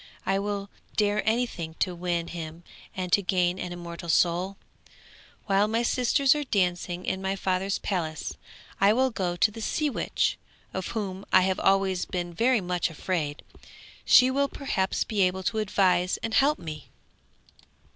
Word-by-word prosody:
I 195 0 +1
will 200 0 -3 0.2
dare 210 0 +2
anything 220 -9 -2
to 180 - -1
win 170 -1 -2
him 165 0 -7 0.3
and 185 -1 -3
to 200 - +5
gain 180 -1 +1
an 180 - -4
immortal 170 -1 -7
soul! 180 +4 +2 0.9
While 200 0 +3
my 225 +2 0
sisters 255 +3 +3
are 300 -1 -2
dancing 180 -5 -1
in 190 - -2
my 190 0 -1
father's 190 +1 -1
palace 160 -6 -3 0.4
I 200 +2 +5
will 260 +2 +2
go 185 -5 -2
to 205 +4 +3
the 225 - -8
sea 300 +6 0
witch, - - 0 0.3
of 190 -1 -3
whom 195 -2 -4
I - - +7
have 190 0 +1
always 195 -2 +2
been 175 -1 -4
very 235 +5 +2
much 180 -1 -1
afraid; 155 -2 -3 0.6
she 255 +1 +6
will 280 +1 +2
perhaps 195 -10 -1
be 210 -3 -1
able 185 0 +1
to 220 +3 0
advise 185 -3 +2
and 225 0 -2
help 285 +5 +4
me!' 155 -3 -8
190 Hz, 160 wpm, -27 LUFS, 175-215 Hz, 0.9 s, I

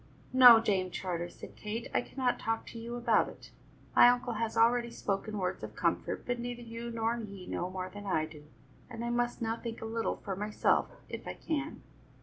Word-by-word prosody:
"No, 250 -3 +10
Dame 195 -5 +1
Charter," 175 -1 -3
said - - -11
Kate, 220 +2 -4
"I - - +3
cannot 255 0 -1
talk 225 0 -1
to 230 - -8
you 235 +1 -5
about 235 -2 +3
it. - - -13 0.4
My 245 - +9
uncle 245 0 +1
has 225 0 -2
already 235 +1 +4
spoken 210 -1 -3
words 185 -2 -2
of - - -7
comfort, - - -1
but 245 -1 -1
neither 240 0 -5
you 230 0 -6
nor 230 0 0
he 200 -5 -7
know 180 - -3
more 185 0 -4
than 205 +2 -9
I 160 -5 +1
do, 155 -2 -12 0.4
and 235 -1 -5
I 240 - -1
must 240 0 0
now 225 0 -1
think 230 -1 -6
a - - -6
little 225 0 -1
for 195 -2 -5
myself, 210 +2 +1 0.2
if - - -7
I - - -4
can." 305 -1 -3
225 Hz, 205 wpm, -31 LUFS, 200-240 Hz, 0.4 s, No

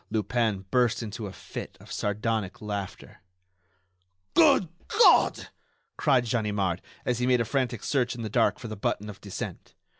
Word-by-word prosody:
Lupin 110 -2 0
burst 125 -2 +2
into 110 0 -5
a - - -7
fit - - -8
of - - -14
sardonic 105 -1 -2
laughter. 100 -4 -6 1.1
"Good 185 - +5 0.2
God!" 445 +2 +5 0.5
cried 125 -2 +3
Ganimard, 105 -6 0 0.2
as 125 -1 0
he 125 - +1
made 125 -1 +4
a 115 - +1
frantic 125 -2 -1
search 125 -3 0
in 120 - -6
the - - -2
dark 115 +2 +2
for 115 - -8
the 110 - -5
button 105 +1 -2
of 100 - -15
descent. 100 -3 -7
110 Hz, 155 wpm, -27 LUFS, 105-125 Hz, 1.1 s, Good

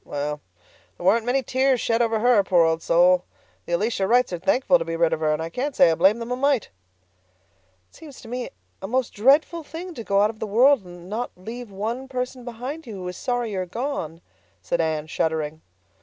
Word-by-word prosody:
Well, 145 +1 -4 0.6
there 175 - -8
weren't 225 +4 +3
many 265 +2 +1
tears 260 0 +2
shed 230 +1 +1
over 225 -2 +1
her, 240 -4 +4
poor 180 -3 +4
old 165 0 0
soul. 180 +2 +4 0.4
The 175 - -3
Elisha 195 +1 0
Wrights 245 -2 +3
are 175 - -3
thankful 255 +8 +3
to - - -1
be 165 0 -3
rid 165 0 +2
of - - -1
her, 155 -1 +1
and 155 +1 -1
I 165 - -6
can't 270 - -3
say 165 - +6
I - - +3
blame 190 +7 +4
them 235 +1 -6
a - - +1
mite." 275 -2 +1 1.2
"It - - -23
seems 295 -5 -12
to 230 - -13
me 245 +1 -4 0.3
a 195 - -5
most 255 +2 -1
dreadful 285 +9 +3
thing 335 +4 -8
to 235 - -7
go 200 -1 +2
out 210 +1 +3
of 220 - -20
the 220 - -3
world 245 +3 +4
and 175 0 -12
not 225 +5 -3
leave 230 +5 -8
one 225 +7 -4
person 255 -1 -4
behind 250 +6 -7
you 220 - -7
who 185 -2 -6
is 180 - -7
sorry 245 -3 -2
you 195 - -2
are 185 - -3
gone," 175 - -4 0.4
said 170 - -1
Anne, 155 -2 -1
shuddering. 160 -1 -2
220 Hz, 225 wpm, -24 LUFS, 175-250 Hz, 1.2 s, say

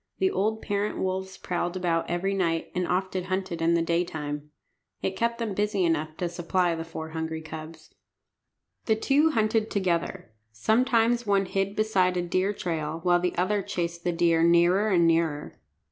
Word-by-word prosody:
The 380 0 +2
old 220 +3 -1
parent 205 0 -1
wolves 190 0 -3
prowled 175 0 -2
about 170 -2 0
every 180 +3 0
night, 165 -4 -1
and 180 -1 -1
often 185 0 -1
hunted 185 -3 -3
in 165 +1 +3
the 170 - +2
daytime. 155 -4 -2 0.5
It 190 - -1
kept 235 +3 0
them 225 -4 -2
busy 205 -1 +1
enough 155 -1 -1
to 175 - -1
supply 175 +1 0
the 165 0 -4
four 160 -1 -7
hungry 160 0 -4
cubs. 160 +1 -9 0.9
The 220 - +3
two 285 +8 +3
hunted 220 -4 +1
together. 170 - -1 0.2
Sometimes 230 - +2
one 200 -1 +3
hid 195 +1 -1
beside 190 -4 +2
a 175 - 0
deer 185 +3 0
trail, 165 -5 -3
while 175 -1 +4
the 180 0 -1
other 200 +3 +1
chased 170 -2 -3
the 175 - +1
deer 170 -1 +2
nearer 170 +5 +4
and 175 -4 +4
nearer. 165 -3 0
180 Hz, 170 wpm, -27 LUFS, 165-200 Hz, 0.9 s, while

